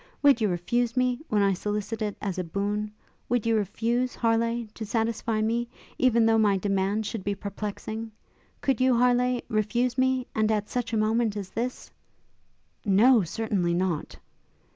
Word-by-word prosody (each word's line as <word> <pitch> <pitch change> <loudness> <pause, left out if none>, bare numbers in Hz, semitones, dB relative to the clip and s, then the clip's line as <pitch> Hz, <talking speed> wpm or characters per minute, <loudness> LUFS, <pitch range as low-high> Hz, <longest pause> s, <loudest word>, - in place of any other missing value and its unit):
would 280 -5 +5
you 215 - +3
refuse 235 +8 -1
me 250 -1 +2
when 210 -1 +2
I 195 -1 +3
solicit 210 +3 -3
it 210 -2 -2
as 190 -3 -2
a - - -1
boon? 205 +4 -2 0.4
would 245 -2 +1
you 230 -1 +2
refuse, 230 +5 0
Harleigh, 230 0 +1
to 225 - -6
satisfy 225 0 -1
me, 235 +2 0 0.3
even 235 -3 +4
though 225 0 +4
my 205 -3 +3
demand 195 +2 0
should 205 -1 -4
be 200 +1 -1
perplexing? 210 +2 -5 0.5
could 265 -3 +1
you, 255 -2 +4
Harleigh, 250 0 +3
refuse 235 +3 0
me? 260 -1 +2
And 220 0 +1
at 210 -1 -1
such 245 -2 -2
a 225 - 0
moment 215 0 +1
as 195 -2 -6
this?' 245 +5 -4 0.9
'No, 220 +4 +5
certainly 185 -2 -1
not!' 175 -3 -2
220 Hz, 165 wpm, -27 LUFS, 205-240 Hz, 0.9 s, would